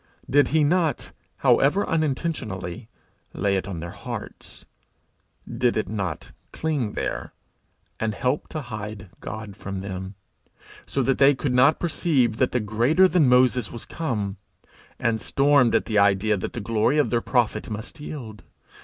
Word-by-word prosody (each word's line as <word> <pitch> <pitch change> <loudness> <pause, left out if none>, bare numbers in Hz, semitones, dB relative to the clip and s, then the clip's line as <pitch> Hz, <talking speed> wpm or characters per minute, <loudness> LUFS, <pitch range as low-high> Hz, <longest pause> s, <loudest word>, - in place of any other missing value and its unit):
Did 145 +1 +4
he 155 0 +2
not, 160 -2 +1 0.3
however 165 +9 +4
unintentionally, 130 - -2 0.5
lay 100 -1 +1
it 95 -1 -2
on 90 -5 -5
their 85 +1 -6
hearts? - - -8 0.8
Did 120 -2 0
it 110 - -1
not 95 -6 -4 0.2
cling 145 -9 -2
there, - - -4 0.7
and 110 -1 -1
help 130 +6 -1
to 155 - -5
hide 105 -4 -7
God 110 -1 -7
from 95 0 -6
them, 95 0 -6 0.7
so 135 - 0
that 135 +1 +1
they 140 0 +6
could 130 0 -2
not 130 +5 +5
perceive 145 -9 +1
that 130 - +2
the 125 - +1
greater 120 - +3
than 170 -8 +3
Moses 125 -2 +3
was 120 - -8
come, 105 - -3 0.6
and 115 -2 0
stormed 140 -3 +3
at - - +2
the 105 -2 +1
idea 100 +1 +3
that 95 - -4
the - - -4
glory 115 +6 +1
of 150 - +2
their 120 -1 +2
prophet 115 -4 0
must 110 +8 -7
yield? 120 -8 -8
120 Hz, 155 wpm, -24 LUFS, 105-145 Hz, 0.8 s, they